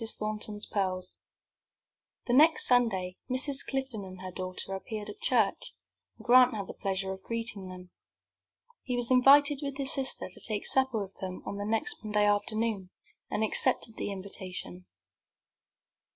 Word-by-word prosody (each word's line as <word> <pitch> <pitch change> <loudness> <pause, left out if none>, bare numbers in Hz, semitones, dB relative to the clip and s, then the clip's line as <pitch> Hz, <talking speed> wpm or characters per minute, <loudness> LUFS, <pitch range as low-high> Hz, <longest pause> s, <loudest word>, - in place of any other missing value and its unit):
THORNTON'S 215 -1 -2
PEARLS 185 -2 -3 1.1
The 240 - -1
next 310 +5 +6
Sunday 195 -8 +1
Mrs. 270 +2 +1
Clifton 265 -6 -3
and 185 -1 -10
her 185 0 -7
daughter 185 +1 -5
appeared 210 +2 -6
at 210 - -10
church, 220 -6 0 0.4
and - - -15
Grant 250 0 +6
had 200 -2 -4
the - - -9
pleasure 190 0 -3
of 190 - -11
greeting 225 -3 -4
them. 180 -1 -11 0.9
He 250 - -3
was 245 0 0
invited 280 +3 +6
with 280 -2 -5
his 275 -2 +3
sister 265 -1 +1
to - - -8
take 210 -2 -1
supper 265 -3 +3
with 195 -1 -6
them 185 -1 -7
on 200 - -5
the 205 - -4
next 225 - -1
Monday 210 -1 +1
afternoon, 205 -1 -1 0.4
and 215 - -1
accepted 225 0 +1
the - - -3
invitation. 185 -2 -6
215 Hz, 150 wpm, -29 LUFS, 190-250 Hz, 1.1 s, next